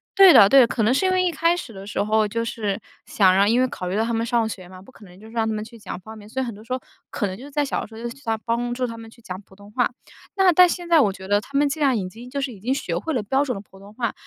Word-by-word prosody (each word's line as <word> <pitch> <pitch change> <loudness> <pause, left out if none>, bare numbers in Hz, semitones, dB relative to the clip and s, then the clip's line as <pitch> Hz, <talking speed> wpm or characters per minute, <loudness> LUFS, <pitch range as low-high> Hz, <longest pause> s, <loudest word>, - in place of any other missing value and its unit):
对 390 -4 +9
的 200 - +8
对 275 - +7
的， 240 - +5
可 230 - -1
能 215 - +3
是 275 - +1
因 375 - +3
为 370 0 +2
一 360 - +1
开 335 +3 +2
始 350 -8 -7
的 195 -2 -10
时 205 - -2
候 215 0 +2
就 230 +3 -2
是 215 -3 -3 0.2
想 190 -3 +4
让 200 +2 +4
因 240 +3 +3
为 255 - +3
考 185 -7 -6
虑 180 - -2
到 220 - +2
他 235 +1 -2
们 225 0 0
上 235 -2 +1
学 185 -4 -8
嘛， 185 0 -13
不 195 - -16
可 215 - -16
能 180 -1 -16
就 215 +3 -14
是 225 - -14
让 225 -1 0
他 220 - -1
们 215 0 -3
去 230 +2 -13
讲 205 - -7
方 220 +3 -11
言， 205 - -13
所 260 +5 -3
以 - - -1
很 235 - -5
多 205 - -13
时 230 - -5
候 255 - -3 0.3
可 210 - -1
能 185 0 -6
就 245 - -11
是 290 - -12
在 290 +1 0
小 275 - -2
的 - - -7
时 220 - -14
候 225 - -9
就 240 - -3
去 270 +4 -12
他 225 -1 0
帮 235 +2 -2
助 250 +1 -1
他 230 -1 -6
们 225 0 -10
去 235 - -19
讲 185 -4 -7
普 190 - -20
通 200 +1 -15
话。 245 +3 +1 0.5
那 385 -2 +5
但 360 +2 +7
现 350 0 -4
在 335 -2 +6
我 205 -9 +3
觉 190 0 -10
得 205 +1 +3
他 275 +6 -5
们 290 0 +3
既 310 - -4
然 275 -5 +3
已 185 -3 -3
经 235 +6 -12
就 280 +2 -3
是 270 -1 -2
已 205 - -13
经 240 +7 -1
学 - - -3
会 320 - -3
了 245 - 0
标 265 +7 +1
准 250 - -2
的 195 - -6
普 195 -1 -19
通 200 +2 -14
话， 235 0 -2
230 Hz, 395 characters per minute, -23 LUFS, 205-265 Hz, 0.5 s, 对